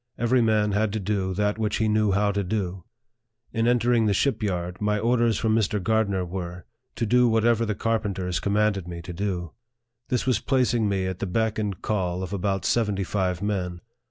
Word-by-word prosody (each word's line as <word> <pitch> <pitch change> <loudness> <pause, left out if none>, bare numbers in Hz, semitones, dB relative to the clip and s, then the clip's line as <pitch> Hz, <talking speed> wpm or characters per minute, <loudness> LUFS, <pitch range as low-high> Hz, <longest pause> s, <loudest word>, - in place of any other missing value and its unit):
Every 120 +2 +2
man 110 -2 +2
had 105 +1 +1
to 110 - -1
do 95 -2 -1
that 105 +2 0
which 105 -2 0
he 110 - +1
knew 105 -1 +2
how 100 +1 +2
to 100 0 -1
do. 95 -2 -3 0.7
In 115 +1 +1
entering 120 -1 +3
the 100 - +2
ship 140 +4 +1
yard, 90 -3 -3
my 105 0 +1
orders 115 0 +2
from 110 -1 +1
Mr. 105 -1 +1
Gardner 100 -2 +1
were, 90 0 -6 0.3
to 115 - -1
do 125 +3 +4
whatever 115 0 +2
the 105 - -1
carpenters 100 -5 -1
commanded 100 -2 +1
me 85 -1 -7
to 90 - -7
do. 90 -3 -3 0.6
This 125 - 0
was 125 -5 +2
placing 120 -4 +1
me 95 -1 0
at 95 -1 -4
the 100 - -2
beck 110 +3 0
and 100 -3 -2
call 95 -3 -1
of 95 +1 -5
about 95 -1 -1
seventy 105 -4 +1
five 95 -1 -1
men. 90 -4 -2
105 Hz, 195 wpm, -25 LUFS, 95-110 Hz, 0.7 s, do